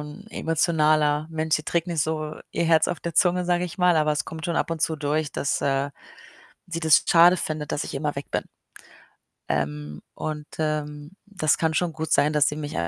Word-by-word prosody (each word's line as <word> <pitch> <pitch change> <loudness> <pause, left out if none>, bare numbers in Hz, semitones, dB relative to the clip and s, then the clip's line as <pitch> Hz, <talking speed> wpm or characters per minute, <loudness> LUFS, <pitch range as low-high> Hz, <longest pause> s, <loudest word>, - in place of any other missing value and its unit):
'n 150 +8 -9
emotionaler 155 -2 +2
Mensch, 160 0 0
sie 155 - -6
trägt 170 0 0
nicht 165 -4 0
so 155 -1 -3 0.2
ihr 170 - 0
Herz 160 -1 +4
auf 175 - -3
der 170 -2 -5
Zunge, 180 0 +3
sage 175 0 +1
ich 175 +2 -8
mal, 180 -2 +4
aber 155 -1 +2
es 150 - -1
kommt 160 0 -7
schon 170 -2 -1
ab - - 0
und 165 - -3
zu 160 - +1
durch, 150 0 -1
dass, 140 - -1
äh, 140 0 0 0.8
sie 170 -1 -4
das 160 -3 +5
schade 175 +2 +6
findet, 155 -3 -4
dass - - -1
ich - - -7
immer 145 +1 -2
weg 140 - -6
bin. - - -1 1.1
Ähm, 75 0 -3
und, 150 -1 -5
ähm, 150 0 -3
das 180 -7 +1
kann 160 -1 +1
schon 175 0 0
gut 160 0 -4
sein, 150 +1 +4
dass 150 -1 +3
sie 150 - -4
mich 150 -1 -5
155 Hz, 210 wpm, -24 LUFS, 150-165 Hz, 1.1 s, schade